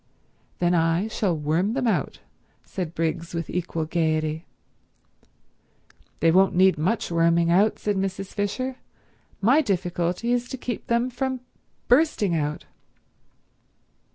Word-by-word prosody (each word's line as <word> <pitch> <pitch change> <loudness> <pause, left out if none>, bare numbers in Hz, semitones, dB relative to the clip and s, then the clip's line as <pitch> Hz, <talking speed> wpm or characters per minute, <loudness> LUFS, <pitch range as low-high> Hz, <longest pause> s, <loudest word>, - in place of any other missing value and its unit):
"Then 175 0 +2
I 165 +4 +2
shall 190 -6 0
worm 160 +8 0
them 265 0 -1
out," 230 - -1 0.4
said 175 -3 -5
Briggs 165 +1 -2
with 170 -2 -4
equal 170 -2 -2
gaiety. 155 -1 -1 1.7
"They 165 +1 +5
won't 190 +2 +4
need 190 +1 +5
much 175 +6 -1
worming 170 0 +3
out," 200 +5 +3
said 205 -2 -1
Mrs. 195 0 -3
Fisher. 250 +6 -2 0.6
"My 255 +10 +5
difficulty 180 - -1
is 245 0 -1
to 265 - -5
keep 240 -2 -5
them 235 +2 +1
from 260 0 -2 0.5
bursting 245 - +3
out." 150 -1 -2
185 Hz, 125 wpm, -24 LUFS, 165-230 Hz, 1.7 s, They